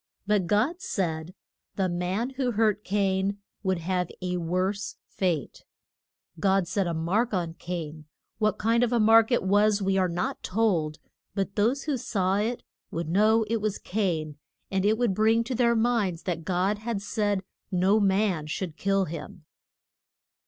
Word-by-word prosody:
But 200 -3 +1
God 250 - +1
said 170 - -2 0.4
the 190 -2 +1
man 180 +8 -1
who 260 -2 -1
hurt 210 -1 +2
Cain 195 0 0 0.2
would 190 -2 0
have 180 +1 -1
a 180 -1 -2
worse 185 +4 -1
fate. 170 -8 -2 0.8
God 190 0 +2
set 190 0 0
a 170 - -1
mark 200 +8 0
on 170 -3 -2
Cain; 160 -3 -6 0.3
what 215 -1 +1
kind 230 +2 +2
of 245 - +1
a 240 - +2
mark 225 +2 +6
it 240 - +2
was 205 +2 +3
we 195 -1 +1
are 185 -1 +2
not 175 +1 -2
told, 180 -8 0 0.4
but 195 -1 -2
those 235 +6 +1
who 295 -3 -1
saw 195 -4 0
it 225 +4 -1 0.3
would 165 -1 -4
know 215 +5 +4
it 225 0 -1
was 210 -2 -1
Cain, 165 -7 -2 0.3
and 190 0 +1
it 215 +1 +3
would 240 -4 +1
bring 220 +3 +3
to 240 - -4
their 235 -1 +3
minds 220 -7 +1
that 170 -3 -3
God 190 +3 0
had 220 -1 -3
said 205 -1 -1 0.3
no 190 +4 +3
man 190 -5 +1
should 165 +1 -4
kill 195 0 +1
him. 160 0 -8
195 Hz, 165 wpm, -27 LUFS, 180-220 Hz, 0.8 s, mark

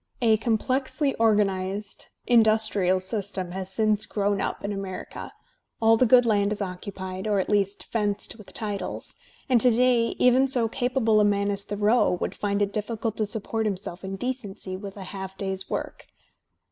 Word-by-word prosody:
A 225 -3 +4
complexly 260 +5 0
organized 200 -2 0 0.2
industrial 215 -5 +3
system 190 -2 -3
has 190 0 -4
since 215 +1 +2
grown 205 -1 0
up - - -3
in 205 - -2
America, 195 -2 -6 0.5
all 225 0 +5
the 250 +2 +3
good 245 +1 +6
land 205 -2 +2
is 210 - -2
occupied, 190 0 -5
or 205 -2 +2
at 190 - -2
least 200 -1 +1
fenced 205 -2 -2
with 210 - -12
titles, 205 -2 -3 0.3
and 250 -3 +4
to 250 - +6
day 240 0 +3
even 255 +2 +4
so 250 -4 +2
capable 245 -2 +1
a - - +5
man 200 0 +2
as 200 0 -1
13ioreau 205 -2 +2
would - - -2
find 205 0 0
it 200 0 -2
difficult 220 +1 -2
to 215 - 0
support 220 +1 -2
himself 190 -2 -5
in 190 0 -4
decency 205 -5 -4
lAith 195 +1 -8
a 195 - -6
half 190 0 -7
day's 190 -1 -4
work. - - -5
205 Hz, 170 wpm, -26 LUFS, 195-225 Hz, 0.5 s, good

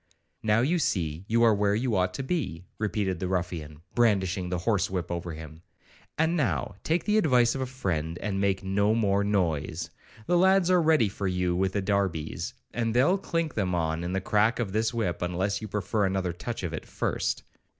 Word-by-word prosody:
'Now 110 +1 +3
you 165 +8 +2
see 85 - -1
you 115 +2 +3
are 115 -2 +6
where 100 0 +2
you 115 0 0
ought 90 -1 +2
to 135 - -3
be,' 130 - -2
repeated 100 -4 -1
the 95 - -2
ruffian, 85 -5 -3
brandishing 95 -6 +2
the 90 - -1
horse 100 +1 +1
whip 90 -2 -3
over 85 -1 -3
him, 80 0 -10 0.6
'and 160 +2 +2
now 130 -8 0
take 165 +1 +1
the 210 +1 +3
advice 125 - +4
of 135 - -3
a 130 - -1
friend, 85 -10 -2
and 100 -1 -2
make 95 -1 +1
no 100 +3 +2
more 100 -3 +2
noise. 85 -5 -1 0.3
The 175 +6 +3
lads 190 -1 +4
are 180 -1 +5
ready 155 -8 +4
for 100 0 -3
you 90 -1 0
with 95 +1 0
the 100 - -1
darbies, 95 -6 -1 0.2
and 115 -1 -1
they'll 175 +11 +4
clink 165 -4 -2
them 95 -4 0
on 80 0 -1
in 90 +1 -3
the 95 - 0
crack 105 +4 +2
of 115 -6 -2
this 110 +2 +1
whip, 110 -8 -2
unless 90 +4 -1
you 110 - -5
prefer 105 +1 -1
another 95 -2 -1
touch 115 +5 -5
of 85 -2 -3
it 80 - -6
first.' - - -2
100 Hz, 200 wpm, -27 LUFS, 90-120 Hz, 0.6 s, are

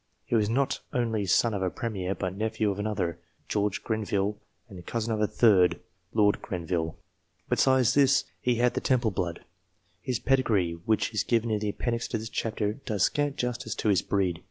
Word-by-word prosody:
He - - -5
was 105 -2 +3
not 135 +4 +1
only 115 -5 0
son 115 +5 +3
of 100 - -2
a 95 - +1
premier, 100 -4 -3
but 95 -1 -3
nephew 110 0 0
of 100 - -5
another, 95 -5 -2 0.3
George 105 -1 -1
Grenville, 105 -2 -1 0.3
and 95 -6 -11
cousin 115 +3 -2
of 105 - -1
a 105 - +3
third, 90 -8 +4 0.3
Lord 105 -1 +3
Grenville. 85 -2 -3 0.5
Besides 130 -1 +4
this, 140 -1 +4 0.2
he 125 -1 +2
had 120 +1 +2
the - - -2
Temple 120 -4 +2
blood. 85 -2 -3 0.6
His 125 +5 -1
pedigree, 115 -9 +2
which 110 +1 +1
is 110 - +1
given 115 -1 +1
in 105 - +1
the 105 0 -2
appendix 115 +3 -2
to 115 - -2
this 110 0 -6
chapter, 105 -2 -1
does 110 -6 -2
scant 145 -1 +1
justice 120 -4 -3
to 110 - 0
his 95 -4 +4
breed. 95 -4 0
110 Hz, 185 wpm, -28 LUFS, 95-120 Hz, 0.6 s, third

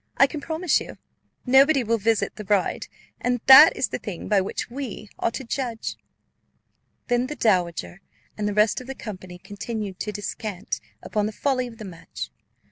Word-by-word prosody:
I - - +7
can 290 +1 -5
promise 320 +1 +1
you, - - -9 0.5
nobody 270 +2 +5
will 230 0 0
visit 220 +1 +1
the 215 - -7
bride, 200 -1 0 0.3
and 245 0 0
that 270 +4 +10
is - - 0
the - - -4
thing 195 -6 -6
by 205 -2 +3
which 190 - -4
we 240 -5 -7
are - - +1
to 250 - -6
judge." 240 -2 -3 1.1
Then 245 +1 +1
the 300 - -5
dowager 180 - 0 0.3
and 210 -1 -2
the 205 - -1
rest 210 +3 +3
of 255 - -12
the 270 - -5
company 185 -6 -8
continued 205 0 -6
to 210 - -3
descant 205 -1 -4 0.2
upon 210 -1 -1
the - - -4
folly 255 +2 0
of 230 -2 -12
the 215 - -8
match. 175 -4 -8
225 Hz, 180 wpm, -24 LUFS, 205-260 Hz, 1.1 s, that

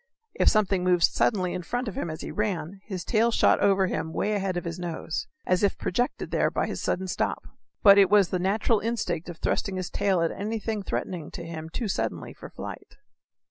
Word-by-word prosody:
If - - +4
something 200 -4 +2
moved 180 -1 +3
suddenly 185 -5 +2
in 180 - -3
front 245 +8 -3
of 210 - -3
him 170 - -3
as 155 0 -6
he - - -6
ran, 195 -3 -2
his 185 -4 -5
tail 230 +1 +3
shot 230 - +4
over 195 -1 +4
him 180 - -2
away 205 +6 -1
ahead 195 -3 -1
of 175 - -4
his 170 +1 -4
nose, 165 -2 -4 0.2
as 185 0 +2
if 200 - +2
projected 245 +7 -2
there - - +2
by - - -1
his - - -4
sudden 190 +1 -1
stop. - - -1 0.4
But 200 -1 +9
it 195 -2 +6
was 200 -3 +5
the 185 - -1
natural 210 +4 +2
instinct 200 -7 -2
of 170 - -7
thrusting 195 +3 -1
his 185 -1 -4
tail 190 -4 +1
at 165 - +1
anything 215 +1 -3
threatening 180 -4 -4
him 165 -1 -7
too 225 +7 -3
suddenly 195 - -3
for - - -11
flight. - - -9
190 Hz, 210 wpm, -27 LUFS, 175-210 Hz, 0.4 s, But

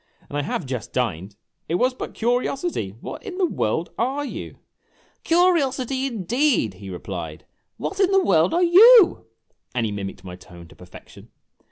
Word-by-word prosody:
And - - -7
I 145 - 0
have 145 +2 -3
just 125 -3 -6
dined. 100 -5 -2 0.3
It 165 - 0
was 250 +7 +1
but - - -8
curiosity. 245 - -1
What - - -7
in 405 -6 -8
the 380 - +2
world 160 - -2
are 270 +5 -1
you? - - -7 0.3
" - - -39
" - - -39
Curiosity, 275 -7 +1
indeed! 235 - 0
" 95 - -18
he 100 - -8
replied. 90 -1 -7 0.2
" - - -53
What 390 - -5
in 385 -2 +4
the 390 -1 +3
world 165 -2 +3
are 350 - +2
you; 405 +4 +7 0.5
And 120 -2 0
he 110 - -2
mimicked 100 -2 -6
my 90 -1 -8
tone 85 -1 -14
to - - -17
perfection. 90 0 -15
235 Hz, 185 wpm, -22 LUFS, -, 0.5 s, you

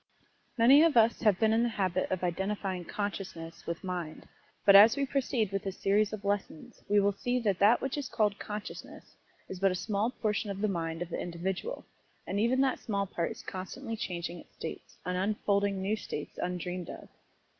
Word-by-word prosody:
Many 255 +6 +7
of 325 -5 +4
us 230 0 +4
have 210 -5 +4
been 220 -1 +3
in 225 - +3
the 240 - +2
habit 185 -4 -1
of 185 -1 -2
identifying 190 0 -2
"consciousness" 190 -5 -5
with 170 +2 -4
mind, 175 -4 -5 0.4
but 200 - +8
as 215 +6 +9
we 280 - +1
proceed 255 -6 0
with 195 -1 -2
this 195 -1 -5
series 205 +1 +2
of 210 -2 -6
lessons 200 -5 -3
we 205 0 +5
will 200 0 +3
see 245 +5 -1
that 200 -5 0
that 215 +4 +5
which 270 +2 -1
is 280 - -5
called 210 -3 +1
"consciousness" 210 0 -8 0.3
is 190 - -7
but 195 0 +4
a 185 - -1
small 210 +3 0
portion 215 -4 -2
of 195 -1 -4
the 215 - +2
mind 165 -3 -2
of 175 - -10
the - - -3
individual, 180 - -4 0.4
and 200 - -2
even 245 +4 +3
that 265 -1 +1
small 200 -3 -1
part 170 -3 -2
is - - -9
constantly 225 +6 -5
changing 175 -4 -4
its - - -17
states, 160 - -8
and 180 0 -1
unfolding 200 0 +1
new 205 +3 +1
states 150 -8 -6
undreamed 180 -1 -3
of. - - -9
200 Hz, 200 wpm, -30 LUFS, 180-220 Hz, 0.4 s, as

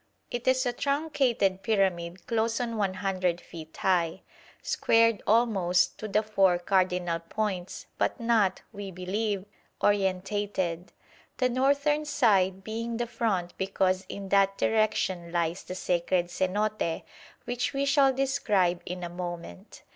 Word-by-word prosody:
It 240 +1 -4
is 260 0 +3
a 245 - 0
truncated 270 -9 0
pyramid 185 -4 0
close 230 0 0
on 235 -2 -2
100 185 -3 -1
feet 160 -2 -11
high, 180 -2 +1 0.4
squared 230 -1 +3
almost 195 -6 +2
to 215 - -4
the 215 +1 +1
four 195 -4 +3
cardinal 180 -2 +1
points, 185 +1 -4
but - - 0
not, 225 -5 +2
we 200 -1 -6
believe, 190 +2 -2 0.3
orientated; 190 -3 0 0.5
the 255 -1 +2
northern 285 +4 +2
side 195 -9 +2
being 230 +2 -4
the 240 - -1
front 205 -7 -2
because 190 -1 +1
in 195 -1 -6
that 195 0 +3
direction 190 -5 0
lies 170 +1 -1
the 185 - -7
Sacred 175 0 0
Cenote 190 -1 -1 0.4
which 245 +1 -1
we 275 0 0
shall 280 -1 +4
describe 225 -10 +1
in 180 0 -5
a - - -2
moment. 175 - -7
195 Hz, 130 wpm, -28 LUFS, 180-230 Hz, 0.5 s, shall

